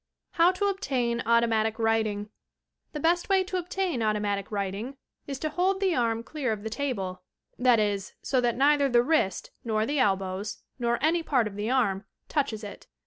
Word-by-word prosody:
UOW 340 +2 +7
TO 405 - 0
OBTAIN 260 -12 0
AUTOMATIC 225 -2 +2
WRITING 220 -2 0 0.6
The 300 - -5
best 345 +5 +1
way 385 -1 +4
to 370 0 -3
obtain 360 -6 -2
automatic 210 -2 0
writing 205 +6 -3 0.3
is 275 -1 -4
to 310 +3 -2
hold 370 +5 +1
the 385 -2 +2
arm 230 -4 0
clear 275 -3 -3
of 210 -2 -4
the 220 - -4
table, 200 -9 -3 0.2
— - - -44
that 235 -2 +6
is, 205 -2 -1
so 255 -2 +1
that 240 -1 0
neither 285 +1 +4
the 240 -1 +4
wrist, 265 - 0
nor 220 -2 0
the 285 +3 -1
elbows, 195 -2 -1 0.2
nor 235 0 +1
any 330 +2 +3
part 265 -7 +1
of 210 -2 -5
the 210 +2 -2
arm 220 -7 +1 0.3
touches 265 -8 -1
it. 205 - -9
235 Hz, 185 wpm, -27 LUFS, 210-295 Hz, 0.6 s, UOW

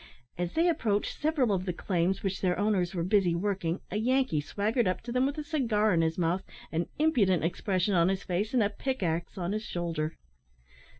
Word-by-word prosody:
As 175 0 -3
they 335 +2 +3
approached 220 -11 0
several 295 -7 +2
of 185 -2 0
the 180 - -1
claims 180 +1 0
which 195 -1 -2
their 180 -2 +1
owners 195 -3 +1
were 170 - 0
busy 185 -2 +3
working, 185 -2 -1
a - - -1
Yankee 255 - +2
swaggered 215 - 0
up 185 - -1
to 240 - -7
them 255 +2 +2
with 285 +2 -4
a 305 - -3
cigar 230 - +1
in 165 - +3
his 160 0 0
mouth, 175 +1 +1 0.3
an 165 +1 -1
impudent 220 - +3
expression 185 +3 0
on 170 0 +4
his 195 0 -1
face, 195 +4 -1
and 240 - +4
a 205 - 0
pick 260 +1 -3
axe 170 +1 -2
on 175 0 -2
his 215 +1 -2
shoulder. 165 -4 -3
195 Hz, 205 wpm, -29 LUFS, 175-225 Hz, 0.3 s, on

